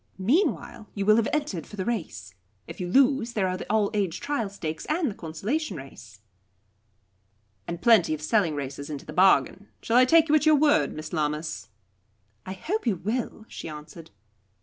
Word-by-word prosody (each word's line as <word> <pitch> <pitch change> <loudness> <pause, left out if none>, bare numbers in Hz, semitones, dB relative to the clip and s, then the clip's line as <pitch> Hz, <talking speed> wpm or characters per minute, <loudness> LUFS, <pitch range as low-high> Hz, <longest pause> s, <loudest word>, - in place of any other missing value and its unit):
Meanwhile, 230 - 0
you 200 -1 -2
will 215 +1 +5
have 230 - +2
entered 285 - -2
for - - -10
the 190 -2 -3
race. 160 - -4 0.3
If - - -9
you 180 - -2
lose, 255 +2 +3
there 195 -4 +1
are 185 - -1
the 185 - -6
'All 215 -2 +2
aged 195 -6 -2
Trial 280 -8 -1
Stakes,' 160 -5 -6
and 310 -4 0
the - - -7
'Consolation 195 - -3
Race.'" 110 -6 -12 1.5
"And 170 0 -6
plenty 210 -9 +5
of 150 - -11
selling 165 -2 +1
races 140 0 -5
into 145 -2 -6
the 155 - -8
bargain. 190 +2 +3
Shall 230 - +1
I 255 - +7
take 325 +4 +5
you 300 - +1
at 310 0 +4
your 310 - +7
word, 295 +1 +3
Miss 155 +1 -8
Lammas?" 150 -8 -2 0.8
"I 190 - -4
hope 330 - -3
you 215 - +2
will," 215 +4 -4
she - - -8
answered. 155 +2 -10
200 Hz, 185 wpm, -26 LUFS, 155-245 Hz, 1.5 s, I